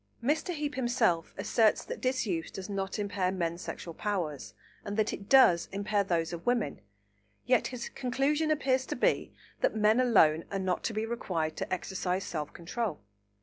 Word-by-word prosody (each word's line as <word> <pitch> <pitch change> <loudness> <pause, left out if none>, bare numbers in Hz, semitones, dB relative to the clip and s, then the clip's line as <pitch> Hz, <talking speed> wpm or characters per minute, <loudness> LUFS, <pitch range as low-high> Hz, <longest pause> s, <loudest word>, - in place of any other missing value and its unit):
Mr. 305 +7 +1
Heape 295 -3 -3
himself 240 - +1
asserts 220 -3 +2
that - - -6
disuse 225 -10 -1
does 190 -1 -7
not 195 0 -2
impair 200 -3 -1
men's 170 -2 -2
sexual 170 - -6
powers, 170 -8 -3 0.3
and 205 +1 -4
that 215 0 +1
it 200 - -8
does 220 -11 +6
impair 205 +1 0
those 170 -3 -1
of 170 0 -6
women; 245 0 0 0.6
yet 250 -1 +3
his 250 -2 -5
conclusion 275 +5 0
appears 265 -4 +1
to - - -3
be - - +1 0.3
that - - +1
men 215 +2 +4
alone 165 -11 +4
are 200 - -2
not 185 -2 -1
to 225 - -1
be 215 +1 0
required 170 -9 -2
to - - -4
exercise 185 0 -2
self 155 -5 -4
control. 180 0 -3
205 Hz, 170 wpm, -30 LUFS, 180-245 Hz, 0.6 s, does